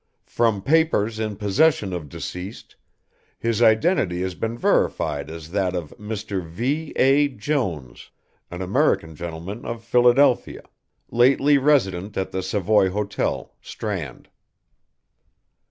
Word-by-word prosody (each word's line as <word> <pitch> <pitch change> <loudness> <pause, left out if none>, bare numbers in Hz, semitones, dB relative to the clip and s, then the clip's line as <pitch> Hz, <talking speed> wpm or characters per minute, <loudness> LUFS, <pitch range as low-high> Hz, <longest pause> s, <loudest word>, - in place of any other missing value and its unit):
"From 110 -4 0
papers 140 -9 +2
in 110 -2 -2
possession 105 - +2
of 80 -5 -5
deceased, 90 +9 -8 0.6
his 115 -1 -1
identity 110 - +3
has 95 -1 -3
been 115 +5 -4
verified 75 -9 0
as 80 0 -9
that 95 -2 0
of 85 -4 -5
Mr. 105 -3 -4
V. 130 - -3
A. 140 +2 +4
Jones, 105 - -3 0.4
an 90 +2 -5
American 80 -4 +1
gentleman 85 +6 -7
of 115 -1 -6
Philadelphia, 125 +2 +3 0.5
lately 135 +4 +4
resident 105 -9 +1
at 95 - -2
the 95 - -2
Savoy 95 +1 +2
Hotel, 100 +1 -3
Strand." 90 - -6
105 Hz, 115 wpm, -23 LUFS, 90-120 Hz, 0.6 s, A